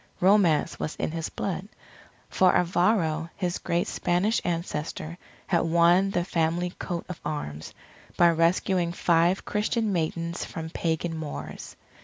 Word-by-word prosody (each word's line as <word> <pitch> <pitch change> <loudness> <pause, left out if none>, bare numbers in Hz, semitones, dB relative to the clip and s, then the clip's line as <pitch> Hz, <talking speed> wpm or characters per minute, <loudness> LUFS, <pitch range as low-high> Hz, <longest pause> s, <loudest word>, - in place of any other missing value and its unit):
Romance 185 -5 +3
was 155 - -3
in - - -2
his 165 -1 -3
blood, 195 0 -4 0.6
for 185 -1 +3
Alvaro, 175 -3 +2
his 180 -2 -2
great 170 +1 0
Spanish 180 +6 +1
ancestor, 165 -1 -3 0.3
had 170 - +2
won 170 +3 +4
the 175 -3 0
family 175 0 0
coat 175 -3 -4
of 180 - -7
arms, 80 - -5 0.5
by 170 -1 +6
rescuing 170 +1 +1
five 170 +2 +2
Christian 215 0 0
maidens 170 0 -2
from 160 -1 -6
pagan 165 0 -1
Moors. 155 -2 -7
170 Hz, 130 wpm, -26 LUFS, 165-180 Hz, 0.6 s, by